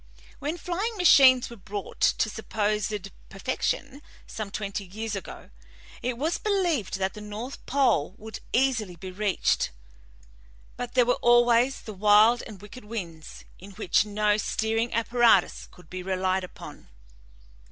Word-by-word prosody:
"When 300 Hz, +5 st, -3 dB
flying 395 Hz, +7 st, -3 dB
machines 260 Hz, -9 st, +6 dB
were -, -, -8 dB
brought 200 Hz, -1 st, -8 dB
to -, -, +3 dB
supposed 210 Hz, -2 st, -2 dB, 0.2 s
perfection, 260 Hz, +6 st, -3 dB, 0.2 s
some 215 Hz, -2 st, -6 dB
twenty 200 Hz, 0 st, -4 dB
years 215 Hz, +3 st, -5 dB
ago, 195 Hz, -, -9 dB, 0.5 s
it 245 Hz, -1 st, -2 dB
was 315 Hz, +6 st, -1 dB
believed 350 Hz, -, 0 dB
that 190 Hz, 0 st, -1 dB
the 210 Hz, +5 st, -7 dB
pole 250 Hz, -, +2 dB
would 220 Hz, +1 st, -8 dB
easily 235 Hz, -8 st, +1 dB
be 185 Hz, +2 st, -8 dB
reached, 200 Hz, 0 st, 0 dB, 1.1 s
but 245 Hz, 0 st, -6 dB
there 250 Hz, -2 st, +5 dB
were 245 Hz, -, +1 dB
always 240 Hz, +2 st, +4 dB
the 215 Hz, -, -8 dB
wild 210 Hz, +4 st, +5 dB
and 210 Hz, -4 st, -11 dB
wicked 210 Hz, +3 st, -12 dB
winds, 170 Hz, -8 st, -7 dB
in 195 Hz, +2 st, -12 dB
which 185 Hz, -2 st, +2 dB
no 210 Hz, 0 st, +1 dB
steering 225 Hz, +2 st, -1 dB
apparatus 230 Hz, -4 st, +3 dB
could 180 Hz, -2 st, -18 dB
be 185 Hz, +2 st, -6 dB
relied 185 Hz, 0 st, -1 dB
upon. 180 Hz, -, -11 dB
215 Hz, 135 wpm, -26 LUFS, 195-245 Hz, 1.1 s, machines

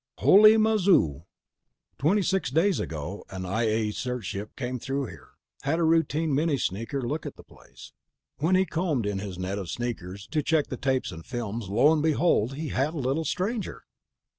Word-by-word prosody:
"Holy 215 Hz, +3 st, +7 dB
mazoo!" 195 Hz, -, +3 dB, 0.7 s
"Twenty 190 Hz, +9 st, +2 dB
six 190 Hz, +1 st, 0 dB
days 165 Hz, +7 st, +2 dB
ago 80 Hz, +6 st, -5 dB
an 95 Hz, -1 st, -6 dB
I 110 Hz, +6 st, 0 dB
A 110 Hz, 0 st, 0 dB
search 125 Hz, 0 st, -4 dB
ship 100 Hz, +3 st, -5 dB
came 125 Hz, 0 st, -4 dB
through 135 Hz, +3 st, -2 dB
here, -, -, -12 dB, 0.3 s
had 145 Hz, +4 st, 0 dB
a 170 Hz, -, +1 dB
routine 160 Hz, -1 st, +2 dB
mini 150 Hz, +1 st, +1 dB
sneaker 115 Hz, +5 st, -3 dB
look 145 Hz, +6 st, -2 dB
at -, -, -8 dB
the -, -, -14 dB
place. -, -, -16 dB, 0.4 s
When 165 Hz, +6 st, +2 dB
he 190 Hz, +1 st, +3 dB
combed 160 Hz, -, -1 dB
in 100 Hz, -1 st, -2 dB
his 95 Hz, -2 st, -6 dB
net 95 Hz, +2 st, -3 dB
of 95 Hz, -4 st, -6 dB
sneakers 100 Hz, -5 st, -5 dB
to 155 Hz, -1 st, +1 dB
check 155 Hz, 0 st, +1 dB
the -, -, -3 dB
tapes 130 Hz, -1 st, 0 dB
and 80 Hz, -2 st, -9 dB
films, 115 Hz, -3 st, -5 dB
lo 125 Hz, +10 st, +4 dB
and 155 Hz, -, +1 dB
behold, 150 Hz, -6 st, +2 dB
he 155 Hz, +1 st, -4 dB
had 140 Hz, +6 st, -1 dB
a -, -, -4 dB
little 140 Hz, +4 st, -1 dB
stranger." 200 Hz, -, -3 dB
135 Hz, 190 wpm, -27 LUFS, 105-160 Hz, 0.7 s, Holy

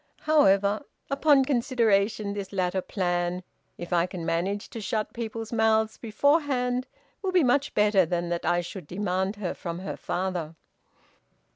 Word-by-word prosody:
However, 205 Hz, -9 st, +3 dB, 0.3 s
upon 275 Hz, -1 st, +4 dB
consideration, 225 Hz, -6 st, +1 dB
this 200 Hz, -2 st, -5 dB
latter 185 Hz, -1 st, 0 dB
plan, 175 Hz, -1 st, -1 dB, 0.3 s
if 175 Hz, +1 st, -5 dB
I 170 Hz, 0 st, +3 dB
can 180 Hz, -3 st, -6 dB
manage 195 Hz, +6 st, -1 dB
to 230 Hz, -, -6 dB
shut 215 Hz, +1 st, -2 dB
people's 225 Hz, -1 st, -5 dB
mouths 220 Hz, -1 st, +2 dB
beforehand, 255 Hz, 0 st, +1 dB, 0.3 s
will 380 Hz, -, -1 dB
be 365 Hz, -3 st, +4 dB
much 280 Hz, +3 st, +1 dB
better 210 Hz, -2 st, +4 dB
than 175 Hz, 0 st, -2 dB
that 170 Hz, 0 st, -2 dB
I 175 Hz, 0 st, +2 dB
should 175 Hz, -2 st, -8 dB
demand 190 Hz, +2 st, -1 dB
her 200 Hz, -4 st, -3 dB
from 170 Hz, -3 st, -5 dB
her 190 Hz, +2 st, -5 dB
father." 175 Hz, -3 st, -3 dB
200 Hz, 145 wpm, -27 LUFS, 180-235 Hz, 0.3 s, upon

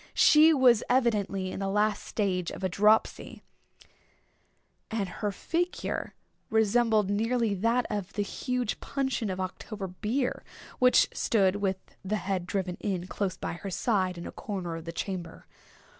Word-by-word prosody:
She 310 Hz, +2 st, +7 dB
was 255 Hz, -7 st, +5 dB
evidently 205 Hz, -7 st, +1 dB
in -, -, -5 dB
the 195 Hz, -, -2 dB
last 210 Hz, +1 st, +1 dB
stage 185 Hz, -5 st, -1 dB
of -, -, -8 dB
a 190 Hz, -, +1 dB
dropsy; 210 Hz, +4 st, +2 dB, 1.5 s
and 220 Hz, -3 st, -1 dB
her 205 Hz, +3 st, -3 dB
figure 345 Hz, -, -2 dB, 0.3 s
resembled 220 Hz, -1 st, +3 dB
nearly 225 Hz, +1 st, +1 dB
that 230 Hz, +5 st, +1 dB
of 200 Hz, -2 st, -4 dB
the 205 Hz, -, 0 dB
huge 250 Hz, +2 st, -2 dB
puncheon 265 Hz, -5 st, -2 dB
of 185 Hz, 0 st, -3 dB
October 195 Hz, +2 st, -5 dB
beer 220 Hz, +8 st, -2 dB, 0.4 s
which 250 Hz, 0 st, +5 dB
stood, 200 Hz, -3 st, +2 dB
with 195 Hz, -2 st, 0 dB, 0.3 s
the 200 Hz, +3 st, -1 dB
head 190 Hz, -3 st, -2 dB
driven 185 Hz, -2 st, -2 dB
in, 185 Hz, -4 st, -2 dB
close 185 Hz, -1 st, -3 dB
by -, -, -4 dB
her 195 Hz, +4 st, -6 dB
side, 185 Hz, -2 st, 0 dB
in 170 Hz, -, -7 dB
a -, -, -6 dB
corner 185 Hz, -5 st, -5 dB
of 165 Hz, 0 st, -8 dB
the 165 Hz, -, -4 dB
chamber. 175 Hz, -1 st, -5 dB
205 Hz, 150 wpm, -28 LUFS, 185-230 Hz, 1.5 s, She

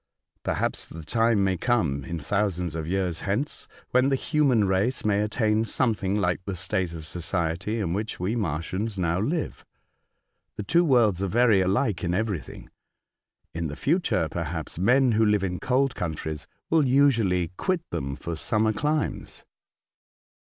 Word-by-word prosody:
Perhaps -, -, -2 dB
the 80 Hz, -, -9 dB
time 115 Hz, 0 st, +2 dB
may 95 Hz, -1 st, +1 dB
come, 80 Hz, -, 0 dB
in 85 Hz, 0 st, -4 dB
thousands 90 Hz, 0 st, -1 dB
of 80 Hz, -1 st, -4 dB
years 90 Hz, -2 st, -1 dB
hence, 110 Hz, +9 st, -2 dB, 0.2 s
when 130 Hz, +2 st, +4 dB
the 135 Hz, -, +2 dB
human 135 Hz, -6 st, +2 dB
race 100 Hz, +7 st, 0 dB
may 105 Hz, -1 st, +2 dB
attain 105 Hz, 0 st, +1 dB
some 115 Hz, +2 st, +1 dB
thing 100 Hz, -2 st, -2 dB
hke 90 Hz, -4 st, +1 dB
the 100 Hz, -, -3 dB
state 95 Hz, -1 st, -2 dB
of 80 Hz, -2 st, -7 dB
society 85 Hz, +5 st, -2 dB
in 90 Hz, -5 st, -1 dB
which 105 Hz, +3 st, -3 dB
we 95 Hz, +6 st, -1 dB
Martians 95 Hz, +2 st, -2 dB
now 85 Hz, -1 st, 0 dB
live. 150 Hz, -, -2 dB, 0.9 s
The 105 Hz, -, -4 dB
two 170 Hz, -, +3 dB
worlds 115 Hz, -, +3 dB
are 100 Hz, -, 0 dB
very 115 Hz, 0 st, +4 dB
much 95 Hz, -, +2 dB
alike 100 Hz, 0 st, 0 dB
in 90 Hz, 0 st, 0 dB
everything. 100 Hz, -, -4 dB, 0.8 s
In 85 Hz, 0 st, -2 dB
the 75 Hz, -, -6 dB
future, 145 Hz, -, +1 dB
perhaps, 80 Hz, 0 st, -4 dB
men 125 Hz, +6 st, +4 dB
who 110 Hz, 0 st, +3 dB
live 105 Hz, -2 st, +3 dB
in 90 Hz, -2 st, -2 dB
cold 130 Hz, +4 st, +1 dB
countries 80 Hz, -3 st, -4 dB, 0.2 s
will 155 Hz, -4 st, +4 dB
usually 115 Hz, -, +3 dB
quit 175 Hz, -, -1 dB
them 70 Hz, 0 st, -3 dB
for 85 Hz, +3 st, -5 dB
summer 110 Hz, +6 st, +1 dB
climes." 150 Hz, +7 st, -2 dB
100 Hz, 160 wpm, -26 LUFS, 85-120 Hz, 0.9 s, when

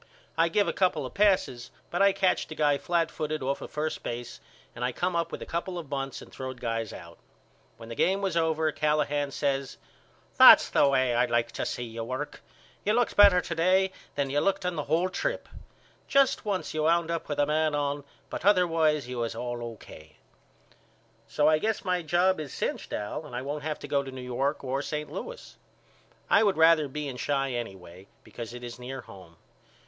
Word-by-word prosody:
I 165 Hz, +1 st, +3 dB
give 205 Hz, +4 st, +2 dB
a -, -, 0 dB
couple 180 Hz, -7 st, +1 dB
of -, -, -8 dB
passes 185 Hz, -, +2 dB, 0.2 s
but 175 Hz, -, 0 dB
I 200 Hz, 0 st, +6 dB
catched 190 Hz, -4 st, 0 dB
a -, -, -5 dB
guy 145 Hz, -2 st, +2 dB
flatfooted 155 Hz, -3 st, -1 dB
off 140 Hz, +1 st, -1 dB
of -, -, -7 dB
first 155 Hz, +1 st, -3 dB
base 120 Hz, 0 st, -6 dB, 0.4 s
and 120 Hz, -, -5 dB
I 125 Hz, -, +1 dB
come 180 Hz, +7 st, -2 dB
up 170 Hz, -1 st, -1 dB
with -, -, -5 dB
a -, -, -8 dB
couple 175 Hz, +2 st, -3 dB
of 160 Hz, -5 st, -8 dB
bunts 135 Hz, -1 st, -4 dB
and -, -, -16 dB
throwed 130 Hz, -1 st, -6 dB
guys 115 Hz, -2 st, -2 dB
out. 85 Hz, +1 st, -11 dB, 0.6 s
When 115 Hz, -, -11 dB
the 115 Hz, -, -6 dB
game 190 Hz, +11 st, +2 dB
was 195 Hz, -3 st, -1 dB
over 160 Hz, -1 st, +1 dB
Callahan 145 Hz, -1 st, 0 dB
says 140 Hz, -1 st, -2 dB, 0.6 s
That's -, -, +9 dB
the 145 Hz, -, +4 dB
way 130 Hz, -2 st, +2 dB
I 120 Hz, +1 st, +3 dB
like 120 Hz, -1 st, 0 dB
to -, -, -3 dB
see 125 Hz, -, -3 dB
you 115 Hz, -1 st, -6 dB
work. 130 Hz, +5 st, -5 dB, 0.4 s
You 210 Hz, -, +2 dB
looked 240 Hz, +1 st, +1 dB
better 200 Hz, -3 st, +7 dB
to 170 Hz, -, -4 dB
day 185 Hz, +3 st, +3 dB, 0.2 s
than 140 Hz, -2 st, -1 dB
you 145 Hz, -, +2 dB
looked 195 Hz, +2 st, 0 dB
on 180 Hz, -1 st, -1 dB
the 150 Hz, -, -3 dB
whole 165 Hz, +5 st, +2 dB
trip. -, -, -3 dB, 0.6 s
Just 275 Hz, -3 st, +3 dB
once 200 Hz, -3 st, -2 dB
you 155 Hz, -, -1 dB
wound 170 Hz, +1 st, +2 dB
up 165 Hz, -1 st, -3 dB
with 145 Hz, -, -2 dB
a 145 Hz, -, +3 dB
man 155 Hz, 0 st, +1 dB
on 145 Hz, 0 st, -1 dB, 0.3 s
but -, -, -5 dB
otherwise 165 Hz, -7 st, +3 dB
you 125 Hz, -1 st, -5 dB
was 115 Hz, -1 st, -2 dB
all 120 Hz, -1 st, -4 dB
O.K. 80 Hz, -9 st, -10 dB, 1.1 s
So 145 Hz, +6 st, +2 dB
I 155 Hz, 0 st, +4 dB
guess 220 Hz, +3 st, -1 dB
my 180 Hz, -1 st, +1 dB
job 175 Hz, +3 st, +2 dB
is 150 Hz, -4 st, -6 dB
cinched -, -, -3 dB
Al 105 Hz, +9 st, -4 dB
and 145 Hz, -5 st, -9 dB
I 125 Hz, -, -3 dB
won't 145 Hz, +2 st, -4 dB
have 155 Hz, 0 st, -3 dB
to -, -, -9 dB
go 140 Hz, -, +1 dB
to 135 Hz, -, -8 dB
New 130 Hz, 0 st, -8 dB
York 135 Hz, +4 st, -2 dB
or 135 Hz, +1 st, -1 dB
St. 150 Hz, 0 st, -4 dB
Louis. 485 Hz, -, -8 dB, 0.7 s
I -, -, +5 dB
would 200 Hz, -5 st, +2 dB
rather 160 Hz, -2 st, +5 dB
be 150 Hz, +2 st, -5 dB
in 125 Hz, -2 st, -6 dB
Chi 135 Hz, -2 st, 0 dB
anyway 95 Hz, -6 st, -7 dB, 0.2 s
because 120 Hz, 0 st, -8 dB
it 125 Hz, -, -9 dB
is 120 Hz, 0 st, -7 dB
near 130 Hz, +1 st, -6 dB
home. 95 Hz, -7 st, -14 dB
150 Hz, 210 wpm, -28 LUFS, 125-170 Hz, 1.1 s, That's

